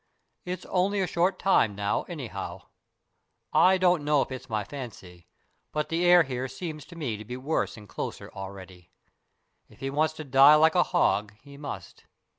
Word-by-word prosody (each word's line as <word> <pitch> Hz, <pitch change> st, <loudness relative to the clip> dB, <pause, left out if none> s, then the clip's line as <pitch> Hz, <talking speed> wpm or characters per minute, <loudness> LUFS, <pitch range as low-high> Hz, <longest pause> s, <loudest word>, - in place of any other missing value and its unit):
It's 180 Hz, 0 st, -5 dB
only 195 Hz, +2 st, +1 dB
a 190 Hz, -, +2 dB
short 175 Hz, +2 st, +1 dB
time 115 Hz, -, +3 dB
now, 100 Hz, 0 st, -1 dB
anyhow. -, -, -6 dB, 0.9 s
I 185 Hz, +1 st, +5 dB
don't 180 Hz, -4 st, +3 dB
know 145 Hz, -1 st, +3 dB
if -, -, -12 dB
it's 130 Hz, -1 st, -7 dB
my 110 Hz, -2 st, -1 dB
fancy, 100 Hz, -8 st, -10 dB, 0.4 s
but 150 Hz, 0 st, -2 dB
the 165 Hz, +2 st, 0 dB
air 175 Hz, -1 st, +7 dB
here 130 Hz, -2 st, -4 dB
seems 150 Hz, +3 st, -7 dB
to 170 Hz, -, -13 dB
me 135 Hz, -10 st, -3 dB
to 105 Hz, -, -8 dB
be 125 Hz, +3 st, -7 dB
worse 135 Hz, -1 st, -2 dB
and 105 Hz, -1 st, -12 dB
closer -, -, -6 dB
already. 95 Hz, -2 st, -10 dB, 0.8 s
If -, -, -19 dB
he 135 Hz, 0 st, -3 dB
wants 155 Hz, +2 st, +1 dB
to 155 Hz, -, -6 dB
die 140 Hz, +2 st, +7 dB
like 160 Hz, +1 st, +5 dB
a 180 Hz, -, +4 dB
hog, 105 Hz, -, +1 dB
he 140 Hz, 0 st, -13 dB
must. 145 Hz, 0 st, -8 dB
145 Hz, 180 wpm, -27 LUFS, 110-170 Hz, 0.9 s, air